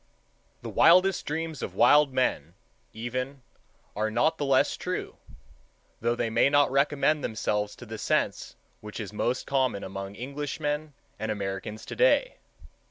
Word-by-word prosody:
The - - -5
wildest 185 +2 +5
dreams 160 0 -3
of - - -5
wild 150 -1 +5
men, 90 - -1 0.4
even, 125 +4 -5 0.5
are 110 +1 0
not 160 +9 +1
the 145 - 0
less 135 -1 +3
true, - - -4 0.8
though 120 +1 0
they 115 -1 -2
may 125 - +4
not 145 -1 +3
recommend 145 +2 +2
themselves 105 -1 -2
to 120 - -11
the 110 -1 -7
sense - - -1 0.2
which 105 +1 -8
is 105 -2 -6
most 120 +4 -1
common 130 -7 0
among 95 +1 -6
Englishmen 145 +3 -4 0.3
and 110 +1 -3
Americans 100 +1 -5
to - - -7
day. - - +3
130 Hz, 145 wpm, -27 LUFS, 110-150 Hz, 0.8 s, wildest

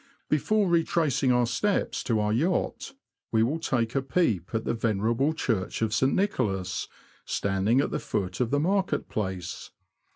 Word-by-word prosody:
Before 205 +7 +2
retracing 160 -6 +2
our 125 -1 +3
steps 190 - 0
to 115 -3 +1
our 105 0 +1
yacht, 175 - -1 0.4
we 110 -1 +3
will 145 +8 0
take 120 -8 0
a 135 - +1
peep 130 - 0
at 110 0 -2
the - - 0
venerable 115 +5 +1
Church 115 -9 -1
of 110 -1 0
St. 130 +4 +3
Nicholas, 95 - -1 0.4
standing 100 +5 +1
at - - -2
the - - -1
foot 90 -2 -3
of 125 -3 +1
the 145 - +2
Market 190 +4 0
Place. 95 -5 -4
120 Hz, 160 wpm, -27 LUFS, 105-155 Hz, 0.4 s, our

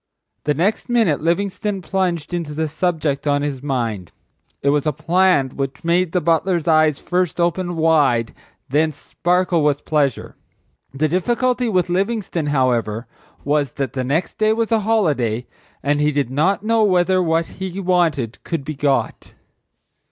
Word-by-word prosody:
The 150 0 +1
next 195 - 0
minute 225 -12 +2
Livingstone 195 +3 -1
plunged 175 -2 -2
into 165 -4 -3
the 160 +1 -1
subject 155 -3 -1
on 145 0 +2
his 140 -3 -3
mind. 115 - -3 0.5
It 140 - +3
was 145 +1 +1
a - - +3
plan 175 -2 +2
which 135 +4 -5
made 170 +1 +1
the 180 - +1
butler's 170 +1 +1
eyes 155 -2 +4
first 180 -1 -1
open 175 +1 0
wide 145 -8 +3
and - - -20 0.3
then 155 +4 +2
sparkle 175 +2 0
with 145 -1 0
pleasure. 145 -6 0 0.6
The 145 +3 0
difficulty 240 - 0
with 185 -4 +1
Livingstone, 190 -3 -1
however, 125 -5 0 0.4
was 145 -2 0
that 135 -4 -3
the 130 - -2
next 145 +7 -2
day 215 0 +3
was 230 0 -1
a 225 - +4
holiday 150 - 0 0.4
and 145 +1 +1
he 150 0 +3
did 140 -4 -1
not 180 +9 +1
know 225 0 +2
whether 185 -1 +3
what 165 -1 +1
he 190 +1 -6
wanted 170 - 0
could 165 -5 -4
be 155 - -4
got. 140 -1 -1
160 Hz, 160 wpm, -20 LUFS, 145-185 Hz, 0.6 s, eyes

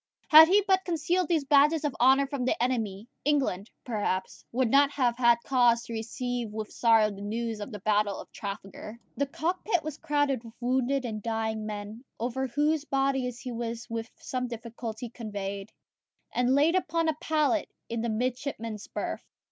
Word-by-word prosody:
Had 315 +1 +10
he 400 +4 +4
but 380 -1 +3
concealed 345 +1 0
these 315 -4 +1
badges 295 +2 +4
of 290 - -1
honour 265 +2 +6
from 275 -2 -3
the 250 - +1
enemy, 225 -4 -1 0.2
England, 260 -9 0 0.2
perhaps, 205 -5 -2
would 250 +1 +1
not 280 0 +6
have 245 -4 +1
had 235 -1 +5
cause 240 -3 +3
to 235 - -8
receive 240 +1 -3
with 215 0 -5
sorrow 225 -2 +4
the 200 0 -9
news 225 +1 -3
of 205 +5 -6
the 210 - -5
battle 205 -1 +1
of - - -11
Trafalgar. 200 +2 -7 0.2
The 280 - 0
cockpit 350 +4 -1
was 305 -1 -6
crowded 290 -5 0
with 225 -1 -12
wounded 255 +2 0
and 215 -3 -4
dying 220 -1 -2
men, 210 +2 -6 0.2
over 255 +3 -2
whose 295 +4 +1
bodies 270 -3 -1
he 250 - -5
was 235 0 -4
with 230 0 -3
some 250 -1 -3
difficulty 235 0 -6
conveyed, 200 -4 -6 0.6
and 250 +2 +2
laid 300 +4 +4
upon 330 -3 +1
a 315 - +2
pallet 310 -1 +1 0.2
in 230 -1 -3
the 235 - -1
midshipmen's 230 -2 -3
berth. - - -4
245 Hz, 170 wpm, -28 LUFS, 225-280 Hz, 0.6 s, Had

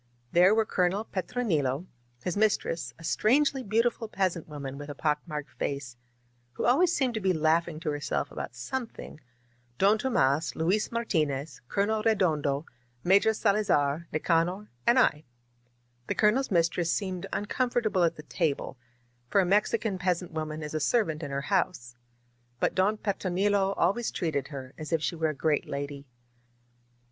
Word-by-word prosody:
There 180 +4 +6
were 220 0 +3
Colonel 185 +2 +1
Petronilo, 175 - -1 0.4
his 180 - -2
mistress, 205 -5 +1
a 165 - -14
strangely 270 - +2
beautiful 230 +1 0
peasant 185 -5 -1
woman 140 -2 -6
with 145 0 -8
a 145 - -6
pock 150 0 0
marked 150 -3 -5
face, 140 -3 -3 0.6
who - - -3
always 310 +9 +4
seemed 265 -7 +1
to 220 - -2
be 190 -2 +2
laughing 160 0 +1
to 155 -3 -1
herself 145 0 -2
about - - -6
some 265 -3 -3
thing; 155 - -11 0.6
Don 205 +3 +4
Tomas, 155 - +1
Luis 185 +7 +1
Martinez, 155 -11 -1
Colonel 215 +6 0
Redondo, 160 -9 +1 0.4
Major 200 +4 +5
Salazar, 170 -8 +1
Nicanor, 170 +6 0 0.2
and 240 - +5
L 150 -12 +4 0.9
The - - -1
Colonel's 225 +6 +3
mistress 170 -1 +1
seemed 185 -3 -2
uncomfortable 225 -3 0
at 165 - +2
the 150 - -10
table; 150 -6 -2 0.5
for - - +3
a 190 - +4
Mexican 200 +1 +1
peas 180 -1 0
ant 175 - -10
woman 155 -1 -4
is 150 - -6
a 155 - 0
servant 160 -2 +1
in 145 - -5
her 140 0 -2
house. 175 -7 -1 0.7
But - - +1
Don 200 +3 +2
Petro 200 -3 -2
nilo 195 +1 +2
always 235 +4 +1
treated 150 -6 -2
her 135 -3 -8
as 155 +1 -6
if 160 -2 +1
she 170 - -1
were 160 -1 0
a 155 - -4
great 150 +1 0
lady. 140 0 -5
175 Hz, 160 wpm, -28 LUFS, 150-210 Hz, 0.9 s, There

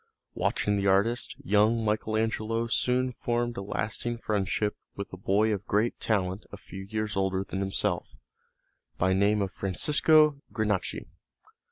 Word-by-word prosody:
Watching 105 0 0
the 100 0 0
artists, 100 +5 +2
young 110 0 +3
Michael 110 +1 0
Angelo 115 +1 -1
soon 125 +2 +1
formed 120 0 -2
a - - -4
lasting 110 +4 -3
friendship 105 -1 -1 0.2
with 100 -1 -7
a - - -3
boy 105 +3 +2
of 100 - -5
great 110 +4 +1
talent 95 -3 0
a - - -8
few 95 0 -9
years 110 +1 -3
older 95 0 0
than 95 - -5
himself, 95 -1 -1 0.8
by 95 +1 +2
name 100 +1 +2
Francesco 150 - +3
Granacci. 105 -4 -1
105 Hz, 140 wpm, -28 LUFS, 95-115 Hz, 0.8 s, young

